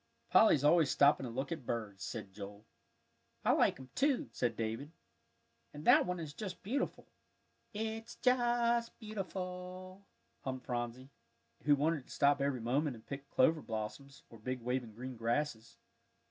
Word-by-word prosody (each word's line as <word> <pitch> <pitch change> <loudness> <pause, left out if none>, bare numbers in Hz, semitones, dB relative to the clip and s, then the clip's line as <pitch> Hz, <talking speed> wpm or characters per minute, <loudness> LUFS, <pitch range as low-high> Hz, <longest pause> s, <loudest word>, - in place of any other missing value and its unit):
"Polly's 155 -10 +6
always 155 0 +5
stopping 140 -1 +4
to - - -4
look 135 +6 -3
at 160 -5 -3
birds," 110 -5 -4
said 105 -5 -5
Joel. 100 +1 -9 0.8
"I - - +5
like - - +3
'em, 130 -1 -11
too," 275 -1 +1
said 120 -2 -1
David. 115 +7 -3 0.8
"And 150 +2 -8
that - - +7
one 180 -1 -2
is 155 -3 -6
just 190 +1 -6
beautiful." 260 +8 -2 0.7
"It's 220 +2 -4
just 240 -2 +2
beautiful," 185 -2 -6 0.4
hummed 130 -1 -4
Phronsie, 120 +2 -4 0.5
who 145 -1 +6
wanted 150 -1 0
to - - -15
stop 140 -1 +3
every 140 -3 0
moment 135 +4 +1
and 110 - -15
pick 140 0 -7
clover 155 +4 +4
blossoms, 115 +5 -6
or 115 - -12
the - - -24
big 130 0 -3
waving 120 -2 -2
green 125 +1 -6
grasses. 115 0 -1
140 Hz, 155 wpm, -35 LUFS, 120-180 Hz, 0.8 s, that